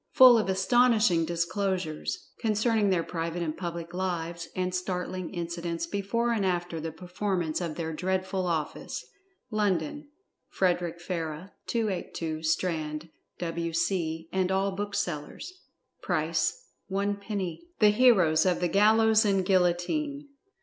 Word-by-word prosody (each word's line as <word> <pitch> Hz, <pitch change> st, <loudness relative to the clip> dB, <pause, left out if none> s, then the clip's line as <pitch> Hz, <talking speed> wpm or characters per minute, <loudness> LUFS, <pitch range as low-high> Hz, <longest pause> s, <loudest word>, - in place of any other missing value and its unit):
FULL 250 Hz, -3 st, +9 dB
OF 210 Hz, -, -1 dB
ASTONISHING 210 Hz, -2 st, +4 dB
DISCLOSURES 170 Hz, -1 st, -2 dB
Concerning 215 Hz, -1 st, +2 dB
their 180 Hz, -3 st, +2 dB
Private 170 Hz, 0 st, -3 dB
and 155 Hz, -2 st, -2 dB
Public 170 Hz, -1 st, -5 dB
Lives, 170 Hz, -2 st, -3 dB
and 185 Hz, 0 st, -1 dB
Startling 180 Hz, 0 st, -3 dB
Incidents 170 Hz, -1 st, -3 dB
before 200 Hz, +6 st, -1 dB
and 220 Hz, -4 st, +1 dB
after 175 Hz, -3 st, -1 dB
the 160 Hz, +1 st, -4 dB
performance 180 Hz, 0 st, -2 dB
of 165 Hz, -3 st, -3 dB
their 160 Hz, -1 st, -3 dB
dreadful 185 Hz, +2 st, -1 dB
office. 160 Hz, -3 st, -3 dB, 0.5 s
LONDON: 205 Hz, -, 0 dB, 0.4 s
FREDERICK 175 Hz, -2 st, 0 dB
FARRAH, 170 Hz, 0 st, -4 dB, 0.2 s
282, 180 Hz, -7 st, -2 dB
STRAND, 160 Hz, -1 st, -1 dB, 0.3 s
W.C. 165 Hz, -1 st, -1 dB
And 190 Hz, -1 st, +1 dB
all 195 Hz, +1 st, +1 dB
Booksellers. 200 Hz, -, -4 dB, 0.5 s
PRICE -, -, +1 dB, 0.4 s
ONE 200 Hz, +1 st, -1 dB
PENNY. 200 Hz, -, -4 dB
THE 210 Hz, -, +6 dB
HEROES 195 Hz, -9 st, +5 dB
OF 180 Hz, -, +2 dB
THE 175 Hz, -, +1 dB
GALLOWS 220 Hz, +3 st, +5 dB
AND 195 Hz, -3 st, +2 dB
GUILLOTINE. 195 Hz, -, +1 dB
180 Hz, 120 wpm, -28 LUFS, 170-200 Hz, 0.5 s, FULL